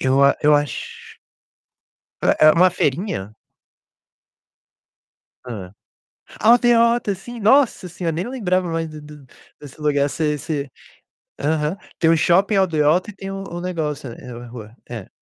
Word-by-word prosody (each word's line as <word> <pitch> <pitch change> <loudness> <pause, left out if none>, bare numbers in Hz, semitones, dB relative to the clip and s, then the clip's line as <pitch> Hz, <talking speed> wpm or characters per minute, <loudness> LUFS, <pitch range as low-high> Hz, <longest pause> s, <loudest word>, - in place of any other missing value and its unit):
Eu 135 +1 +3
a 140 - +4
eu 150 0 +5
acho 145 -4 -4 1.1
É 155 - +4
é 155 - +9
uma 180 +3 +5
feirinha? 135 - -2 2.1
Hã. 100 -7 -7 0.7
Aldeota, 235 -2 +4
sim, 240 +5 -10
nossa 225 -3 +3
senhora, 170 -1 -3
nem 175 +6 -3
lembrava 185 -8 -1
mais 165 0 -2
do 155 -1 -10
do 150 -2 -13 0.3
desse 145 0 -13
lugar. 145 -2 +1
Esse 150 +3 -3
esse 145 -1 -4 0.7
aham. 150 +3 -1 0.2
Tem 165 - +3
o 165 - +4
shopping 190 +6 +3
Aldeota 175 0 +2
e - - -20
tem 195 0 -7
o 195 0 -5
o 175 -2 -7
negócio, 155 -7 -3
eh-eh, 120 0 -10
rua. 115 -1 -11
É. 115 -5 -7
160 Hz, 140 wpm, -21 LUFS, 140-190 Hz, 2.1 s, é